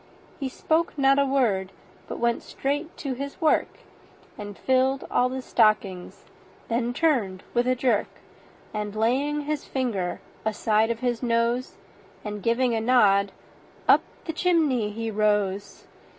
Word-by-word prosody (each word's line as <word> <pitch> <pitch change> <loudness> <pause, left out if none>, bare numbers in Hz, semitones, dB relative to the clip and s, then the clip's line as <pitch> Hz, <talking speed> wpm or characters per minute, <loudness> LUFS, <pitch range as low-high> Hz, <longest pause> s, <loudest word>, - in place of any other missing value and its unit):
He 270 -2 -2
spoke 320 +4 0
not 275 0 +4
a 280 - +3
word, 215 -9 +1 0.4
but - - -5
went 235 0 0
straight 290 +5 -3
to 275 -3 -3
his 280 +2 -6
work, 315 - +1 0.5
And 205 -1 -8
filled 265 +1 +1
all 250 - +3
the 260 0 -5
stockings; 205 -6 +1 0.4
then 235 +1 0
turned 245 - 0
with 240 +1 +1
a 255 - +3
jerk, 245 -4 +1 0.7
And 210 -1 -4
laying 270 +7 +1
his 295 0 -3
finger 220 -9 -2 0.2
aside 220 0 +1
of 230 -1 -3
his 245 -2 -1
nose, 235 +1 0 0.5
And 210 -1 -5
giving 235 +3 +1
a 225 - 0
nod, 200 -5 +4 0.6
up - - +7 0.2
the 325 - -3
chimney 310 -11 +2
he 225 +1 -4
rose. 205 -2 0
240 Hz, 140 wpm, -25 LUFS, 210-270 Hz, 0.7 s, up